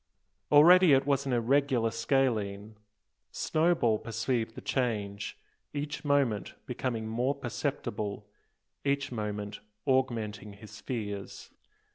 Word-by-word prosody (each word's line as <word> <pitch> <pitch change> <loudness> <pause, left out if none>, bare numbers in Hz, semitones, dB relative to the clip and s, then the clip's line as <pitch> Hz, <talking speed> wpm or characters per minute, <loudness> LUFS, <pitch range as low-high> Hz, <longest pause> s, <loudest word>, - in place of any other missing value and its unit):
Already 160 0 +8
was 140 0 +1
it - - -9
an - - +1
irregular 125 -1 +2
scalene. 110 -4 0 0.5
Snowball 155 -9 +1
perceived 115 0 -2
the - - -7
change, 105 -6 -2 0.4
each 145 +1 -4
moment 140 -8 +1
becoming 115 -4 -3
more 125 +5 0
perceptible, 120 -6 -4 0.6
each 140 -1 0
moment 105 -2 -4 0.3
augmenting 115 -6 0
his 105 +1 -12
fears. 105 -6 -5
120 Hz, 100 wpm, -30 LUFS, 105-140 Hz, 0.6 s, Already